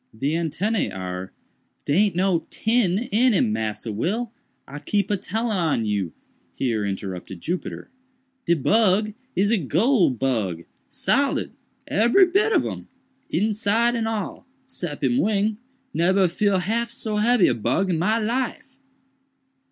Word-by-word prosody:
The 135 Hz, +6 st, -1 dB
antennæ 170 Hz, +7 st, -1 dB
are—" 95 Hz, 0 st, -5 dB, 0.5 s
"Dey 180 Hz, +9 st, +3 dB
aint 195 Hz, -5 st, -2 dB
no 180 Hz, -2 st, +1 dB
tin 220 Hz, -5 st, +1 dB
in 240 Hz, +4 st, +4 dB
him, 110 Hz, -, +2 dB
Massa 110 Hz, +1 st, -3 dB
Will, 205 Hz, -, -2 dB, 0.4 s
I 145 Hz, +2 st, -8 dB
keep 200 Hz, +7 st, -1 dB
a -, -, +3 dB
tellin 220 Hz, +3 st, -2 dB
on 160 Hz, -10 st, +1 dB
you," 100 Hz, -5 st, -1 dB, 0.4 s
here 115 Hz, -5 st, -1 dB
interrupted 95 Hz, -2 st, -5 dB
Jupiter; 180 Hz, -, -5 dB, 0.6 s
"de 170 Hz, -, +4 dB
bug 210 Hz, -, +2 dB, 0.2 s
is 200 Hz, +3 st, +2 dB
a 230 Hz, -, +3 dB
goole 185 Hz, -, +3 dB
bug, 110 Hz, -10 st, -1 dB, 0.2 s
solid, -, -, 0 dB, 0.4 s
ebery 240 Hz, -, +5 dB
bit 400 Hz, +5 st, +2 dB
of -, -, +3 dB
him, -, -, -6 dB, 0.4 s
inside 215 Hz, +5 st, +1 dB
and 230 Hz, -2 st, -1 dB
all, 225 Hz, +3 st, -4 dB, 0.2 s
sep 175 Hz, -, -6 dB
him 125 Hz, -2 st, +2 dB
wing—neber 210 Hz, -2 st, 0 dB
feel 200 Hz, +3 st, +1 dB
half 225 Hz, +6 st, -1 dB
so 220 Hz, -2 st, -3 dB
hebby 225 Hz, -2 st, +4 dB
a -, -, +3 dB
bug 185 Hz, -, 0 dB
in 165 Hz, -, 0 dB
my 215 Hz, +7 st, +2 dB
life." 265 Hz, +4 st, -3 dB
195 Hz, 140 wpm, -23 LUFS, 145-225 Hz, 0.6 s, ebery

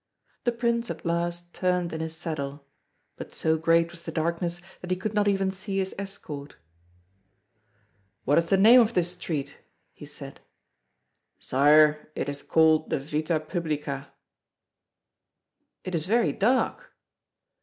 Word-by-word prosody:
The 240 Hz, -, +3 dB
Prince 235 Hz, 0 st, -1 dB
at -, -, -6 dB
last 175 Hz, +1 st, -2 dB
turned 180 Hz, -2 st, 0 dB
in 160 Hz, -, -4 dB
his 160 Hz, 0 st, -5 dB
saddle, 145 Hz, -4 st, -5 dB, 0.5 s
but -, -, -8 dB
so 160 Hz, 0 st, +1 dB
great 165 Hz, +1 st, +2 dB
was 170 Hz, -1 st, -9 dB
the 165 Hz, -, -6 dB
darkness 170 Hz, +2 st, -1 dB, 0.2 s
that 180 Hz, -, -9 dB
he 185 Hz, -, 0 dB
could 210 Hz, +3 st, -3 dB
not 210 Hz, -1 st, +2 dB
even 195 Hz, -1 st, +2 dB
see 195 Hz, +1 st, -5 dB
his 190 Hz, -1 st, -1 dB
escort. 155 Hz, -8 st, -7 dB, 1.7 s
"What 145 Hz, +5 st, +4 dB
is 170 Hz, -, -1 dB
the 195 Hz, -, +3 dB
name 230 Hz, +6 st, +8 dB
of 230 Hz, 0 st, 0 dB
this 175 Hz, -1 st, +2 dB
street?" 155 Hz, -5 st, -5 dB, 0.3 s
he -, -, -11 dB
said. -, -, -10 dB, 1.0 s
"Sire, 150 Hz, +3 st, +4 dB
it -, -, -2 dB
is 145 Hz, 0 st, -4 dB
called 160 Hz, -1 st, +3 dB
the -, -, +1 dB
Vita 155 Hz, +3 st, -1 dB
Publica." 150 Hz, -4 st, -4 dB, 1.7 s
"It 185 Hz, -, -6 dB
is 165 Hz, -1 st, -1 dB
very 230 Hz, +3 st, +3 dB
dark." 255 Hz, -, 0 dB
170 Hz, 145 wpm, -26 LUFS, 155-195 Hz, 1.7 s, name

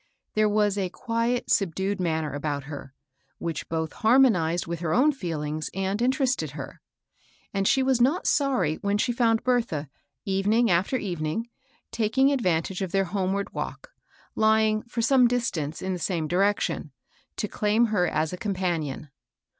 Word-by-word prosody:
There 215 Hz, 0 st, +3 dB
was 205 Hz, -1 st, +2 dB
a 185 Hz, -2 st, -1 dB
quiet, 235 Hz, +3 st, -1 dB
subdued 195 Hz, 0 st, 0 dB
manner 160 Hz, -4 st, -1 dB
about 145 Hz, -1 st, -3 dB
her, 140 Hz, -1 st, -8 dB, 0.5 s
which 165 Hz, -2 st, -4 dB
both 160 Hz, -1 st, -2 dB
harmonized 220 Hz, -9 st, +3 dB
with 170 Hz, -1 st, -4 dB
her 165 Hz, -2 st, -1 dB
own 280 Hz, +6 st, +5 dB
feelings 155 Hz, -, -4 dB
and 195 Hz, +3 st, -1 dB
interested 260 Hz, -, +1 dB
her; 135 Hz, -2 st, -8 dB, 0.7 s
and 195 Hz, 0 st, +1 dB
she 265 Hz, -, +3 dB
was 260 Hz, -2 st, +2 dB
not 285 Hz, +9 st, +2 dB
sorry 255 Hz, -, +1 dB
when 200 Hz, 0 st, 0 dB
she 230 Hz, -, +1 dB
found 230 Hz, -1 st, +2 dB
Bertha, 225 Hz, -, 0 dB, 0.4 s
evening 205 Hz, +4 st, +2 dB
after 185 Hz, +9 st, +2 dB
evening, 180 Hz, +2 st, -3 dB, 0.4 s
taking 230 Hz, +5 st, +2 dB
advantage 185 Hz, -, 0 dB
of 190 Hz, -3 st, -2 dB
their 195 Hz, 0 st, +2 dB
homeward 195 Hz, +2 st, -2 dB
walk, -, -, -6 dB, 0.4 s
lying, 220 Hz, 0 st, +3 dB
for 235 Hz, -1 st, -2 dB
some 255 Hz, 0 st, +5 dB
distance, 185 Hz, -12 st, -2 dB
in 190 Hz, 0 st, -1 dB
the 180 Hz, -, -4 dB
same 165 Hz, -1 st, -1 dB
direction, 195 Hz, +5 st, 0 dB, 0.4 s
to -, -, -2 dB
claim 215 Hz, +2 st, +2 dB
her 180 Hz, -3 st, +3 dB
as 155 Hz, +1 st, -1 dB
a -, -, -4 dB
companion. 175 Hz, -8 st, -2 dB
195 Hz, 155 wpm, -26 LUFS, 165-230 Hz, 0.7 s, own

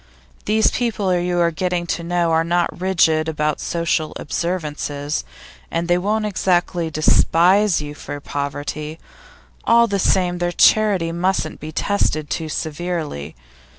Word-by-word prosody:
These 220 Hz, +1 st, +3 dB
people 215 Hz, -6 st, 0 dB
you 175 Hz, 0 st, 0 dB
are 170 Hz, -1 st, +3 dB
getting 180 Hz, +1 st, -1 dB
to 170 Hz, -, -2 dB
know 170 Hz, -1 st, 0 dB
are 160 Hz, 0 st, +3 dB
not 175 Hz, +1 st, -1 dB
rigid 160 Hz, -4 st, +2 dB
about 150 Hz, -1 st, -1 dB
social 170 Hz, -2 st, -1 dB
observances, 150 Hz, -3 st, -3 dB, 0.5 s
and 170 Hz, +1 st, -2 dB
they 175 Hz, 0 st, +3 dB
won't 215 Hz, +3 st, 0 dB
exactly 180 Hz, -4 st, 0 dB
despise 170 Hz, +4 st, +3 dB
you 145 Hz, 0 st, -7 dB
for 145 Hz, 0 st, -7 dB
poverty; 145 Hz, +2 st, -4 dB, 0.7 s
all 235 Hz, 0 st, +5 dB
the 200 Hz, -3 st, -1 dB
same, 180 Hz, -1 st, +1 dB
their 175 Hz, 0 st, 0 dB
charity 195 Hz, -4 st, +3 dB
mustn't 175 Hz, -1 st, -1 dB
be 155 Hz, -, -7 dB
tested 155 Hz, -4 st, -1 dB
too 160 Hz, -1 st, -2 dB
severely. 155 Hz, -, -4 dB
170 Hz, 135 wpm, -20 LUFS, 155-185 Hz, 0.7 s, all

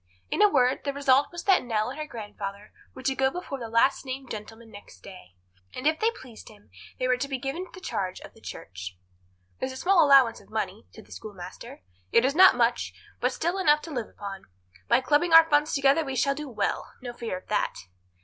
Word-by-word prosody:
In -, -, 0 dB
a 420 Hz, -, +7 dB
word, 255 Hz, -5 st, +2 dB
the 280 Hz, -, -2 dB
result 275 Hz, 0 st, +3 dB
was 345 Hz, -1 st, -7 dB
that 385 Hz, -2 st, +4 dB
Nell 225 Hz, -1 st, -1 dB
and 280 Hz, -, -9 dB
her 305 Hz, -, -4 dB
grandfather 205 Hz, -4 st, -7 dB, 0.2 s
were 260 Hz, -, -10 dB
to 270 Hz, +1 st, +1 dB
go 265 Hz, 0 st, +2 dB
before 280 Hz, -3 st, -6 dB
the 230 Hz, -2 st, -6 dB
last 230 Hz, +4 st, +3 dB
named 265 Hz, -1 st, -6 dB
gentleman 225 Hz, +1 st, -9 dB
next 205 Hz, 0 st, -14 dB
day, 185 Hz, -, -13 dB, 0.4 s
and 255 Hz, -, -6 dB
if 315 Hz, +1 st, +2 dB
they 445 Hz, -, +3 dB
pleased 255 Hz, -, -12 dB
him 205 Hz, -, -19 dB, 0.3 s
they 255 Hz, -, -1 dB
were 255 Hz, 0 st, +2 dB
to 265 Hz, +3 st, -3 dB
be 270 Hz, -1 st, -3 dB
given 275 Hz, +9 st, -4 dB
the -, -, -11 dB
charge 190 Hz, -, -3 dB
of -, -, -12 dB
the -, -, -20 dB
church. 90 Hz, 0 st, -8 dB, 0.6 s
"There's 260 Hz, -, -3 dB
a 260 Hz, -, -8 dB
small 360 Hz, +2 st, +4 dB
allowance 270 Hz, -5 st, +5 dB
of -, -, -22 dB
money," 215 Hz, -1 st, -4 dB
said 220 Hz, -, -14 dB
the -, -, -22 dB
schoolmaster. 185 Hz, -, -10 dB, 0.3 s
"It 230 Hz, -, +4 dB
is 275 Hz, -, +2 dB
not 370 Hz, +4 st, +7 dB
much, -, -, +1 dB, 0.2 s
but -, -, +1 dB
still 345 Hz, +4 st, -2 dB
enough 300 Hz, -4 st, +3 dB
to 330 Hz, -, -8 dB
live 245 Hz, -6 st, -4 dB
upon. 195 Hz, -1 st, -8 dB, 0.4 s
By 235 Hz, +2 st, +4 dB
clubbing 300 Hz, +6 st, +2 dB
our 325 Hz, 0 st, +9 dB
funds 295 Hz, -1 st, +2 dB
together 275 Hz, +3 st, +3 dB
we 270 Hz, -2 st, -4 dB
shall 275 Hz, +2 st, +2 dB
do 295 Hz, 0 st, -7 dB
well; 210 Hz, -5 st, -2 dB
no 245 Hz, -1 st, -5 dB
fear 230 Hz, -6 st, -4 dB
of 185 Hz, -, -14 dB
that." 210 Hz, -, -1 dB
260 Hz, 225 wpm, -27 LUFS, 215-295 Hz, 0.6 s, our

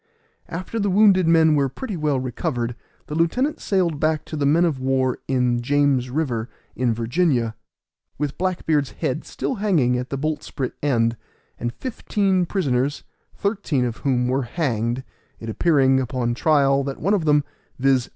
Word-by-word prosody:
After 185 Hz, +7 st, -4 dB
the 205 Hz, -1 st, +1 dB
wounded 190 Hz, -2 st, +5 dB
men 160 Hz, -1 st, +5 dB
were 140 Hz, -2 st, +2 dB
pretty 210 Hz, -, -6 dB
well 150 Hz, -4 st, 0 dB
recovered, 120 Hz, -1 st, -3 dB, 0.3 s
the -, -, -7 dB
lieutenant 210 Hz, -, +1 dB
sailed 175 Hz, -7 st, 0 dB
back 155 Hz, 0 st, 0 dB
to -, -, -6 dB
the 145 Hz, -2 st, +1 dB
men 165 Hz, +5 st, +4 dB
of 155 Hz, -6 st, -1 dB
war 130 Hz, -1 st, 0 dB
in 125 Hz, -2 st, +1 dB
James 140 Hz, -1 st, +2 dB
River, 125 Hz, -5 st, -2 dB, 0.3 s
in 125 Hz, -1 st, +1 dB
Virginia, 120 Hz, 0 st, +1 dB, 0.6 s
with 145 Hz, -1 st, -2 dB
Black 185 Hz, -1 st, -1 dB
beard's 145 Hz, -4 st, +1 dB
head 135 Hz, +4 st, -2 dB
still -, -, -3 dB
hanging 140 Hz, -, +2 dB
at 125 Hz, +1 st, -5 dB
the 135 Hz, -, -3 dB
boltsprit 145 Hz, -2 st, -3 dB
end, 115 Hz, -5 st, +1 dB, 0.4 s
and 120 Hz, -, -2 dB
fifteen 195 Hz, -, -1 dB
prisoners, 140 Hz, -7 st, 0 dB, 0.3 s
thirteen 195 Hz, -, 0 dB
of 120 Hz, -2 st, -3 dB
whom 125 Hz, -3 st, 0 dB
were 130 Hz, +2 st, +1 dB
hanged, 120 Hz, -3 st, -1 dB, 0.4 s
it 115 Hz, -, -7 dB
appearing, 135 Hz, -1 st, +3 dB
upon 125 Hz, -2 st, -1 dB
trial, 140 Hz, 0 st, +3 dB
that 135 Hz, 0 st, -5 dB
one 195 Hz, +6 st, +1 dB
of 185 Hz, -6 st, +1 dB
them, 150 Hz, -1 st, +4 dB, 0.3 s
viz. 130 Hz, -1 st, +2 dB
140 Hz, 160 wpm, -22 LUFS, 125-165 Hz, 0.6 s, wounded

